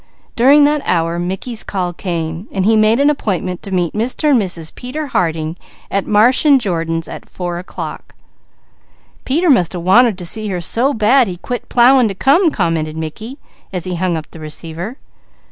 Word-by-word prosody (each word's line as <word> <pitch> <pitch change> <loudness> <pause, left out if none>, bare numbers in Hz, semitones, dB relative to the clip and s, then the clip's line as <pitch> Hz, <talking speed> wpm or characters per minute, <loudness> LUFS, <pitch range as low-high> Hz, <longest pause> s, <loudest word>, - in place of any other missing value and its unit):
During 275 +5 +6
that 295 0 +2
hour, 170 0 0
Mickey's 195 +6 -3
call 180 -3 -3
came. 170 +1 -4
He 200 +3 +2
made 215 +2 +3
an 285 +1 +4
appointment 185 - -3
to - - -8
meet 180 -3 0
Mr. 250 +7 0
and 250 -5 +4
Mrs. 170 -5 -3
Peter 275 +5 -5
Harding 165 - -1 0.3
at 200 0 -1
Marsh 220 +5 +4
& 275 - +7
Jordan's 165 -7 -2
at - - -10
four 175 -1 -4
o'clock. 180 - -8 1.1
"Peter 325 +7 +1
must 180 -10 +2
have 175 -2 -5
wanted 220 +3 +4
to 180 - -7
see 215 +5 -2
her 185 -3 -2
so 240 - +1
bad 235 +4 +4
he 180 -2 -5
quit 245 +7 -6
plowing 250 0 +5
to 195 - -4
come," 310 - +3
commented 165 - -2
Mickey, 215 - -6 0.3
as 180 -3 -4
he 185 - -3
hung 175 -1 -1
up 155 - -6
the 165 - -11
receiver. 165 - -7
190 Hz, 180 wpm, -16 LUFS, 170-245 Hz, 1.1 s, &